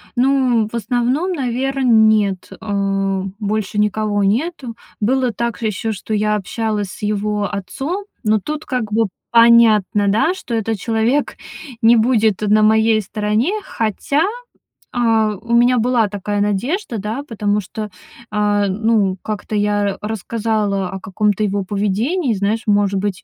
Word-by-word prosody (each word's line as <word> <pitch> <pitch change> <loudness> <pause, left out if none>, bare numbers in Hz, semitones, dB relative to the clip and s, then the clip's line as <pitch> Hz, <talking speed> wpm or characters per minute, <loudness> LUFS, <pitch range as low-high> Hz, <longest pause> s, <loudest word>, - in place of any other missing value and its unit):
ну, 255 -3 +2
в 220 - -16
основном, 245 - 0
наверно, 270 -1 -2
нет, 215 -4 +3
а, 195 -2 -1 0.2
больше 210 -1 -2
никого 210 0 +1
нету. 250 - -1 0.2
Было 255 +3 +1
также 235 0 -2
ещё, 220 +2 -2
что 215 +1 -5
я 210 0 +1
общалась 210 0 -2
с 185 - -11
его 210 0 -1
отцом, 270 - -4 0.2
но 215 -1 +2
тут 300 +9 -5
как 245 -5 -3
бы 225 +1 +2 0.2
понятно, 230 -3 +5
да, 225 - +2
что 260 -10 -5
этот 225 -1 -2
человек 230 +7 0 0.5
не 230 +1 +7
будет 220 -3 +2
на 215 0 +3
моей 220 +1 +4
стороне. 210 - -1
Хотя, 230 - -1 0.7
а, 225 -3 +1
у 235 +1 -3
меня 245 +1 +4
была 235 -1 +2
такая 205 +1 -3
надежда, 235 - -1
да, 220 +7 -4
потому 210 -2 -1
что, 210 +2 -6 0.4
а, 205 -1 +1
ну, 200 -1 +1
как-то 215 0 -4
я 205 -1 0
рассказала 210 -2 -2
о 190 - -5
каком-то 205 +2 0
его 200 -1 0
поведении. 220 - 0
Знаешь, 205 +3 -1
может 205 -1 +2
быть, 195 -2 -3
215 Hz, 140 wpm, -18 LUFS, 205-235 Hz, 0.7 s, не